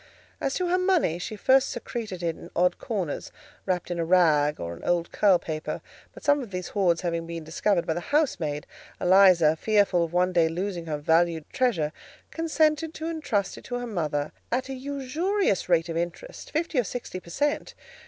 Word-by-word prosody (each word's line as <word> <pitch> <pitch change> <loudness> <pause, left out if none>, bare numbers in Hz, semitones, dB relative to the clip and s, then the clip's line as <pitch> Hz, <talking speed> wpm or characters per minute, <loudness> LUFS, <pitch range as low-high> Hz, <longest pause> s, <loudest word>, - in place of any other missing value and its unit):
As 270 - -1
to 365 - 0
her 365 +1 +2
money, 360 - +2
she 205 +4 -5
first 265 +5 +4
secreted 220 -6 -5
it 165 -1 0
in 170 - -11
odd 180 +1 +2
corners, 190 -10 -3 0.4
wrapped 180 -1 -1
in 175 - -2
a - - +1
rag 160 -4 +3
or 85 0 -4
an - - -14
old 175 -1 0
curl 195 -3 +4
paper; 155 -2 -4 0.3
but - - -14
some 290 0 +3
of 240 - -7
these 180 -2 -5
hoards 180 -5 +2
having 170 -2 -2
been 165 -1 -5
discovered 170 +3 0
by 160 - 0
the 175 - -3
housemaid, 175 - 0 0.3
Eliza, 180 -4 +6
fearful 200 -1 +2
of 165 - -3
one 180 +1 +2
day 165 -2 +4
losing 175 0 -3
her 150 -2 -2
valued 160 +1 +2
treasure, 225 - +1 0.4
consented 315 -1 +1
to 315 - -5
intrust 295 -12 -2
it - - -17
to 245 - -4
her 245 - -4
mother, 155 -9 -2 0.2
at 255 +3 -1
a - - -3
usurious 280 - -1
rate 165 -1 +3
of 165 - -4
interest—fifty 310 - -3
or - - +3
sixty 230 -5 -5
per 175 - -15
cent. 290 +11 -1
185 Hz, 190 wpm, -26 LUFS, 170-260 Hz, 0.4 s, Eliza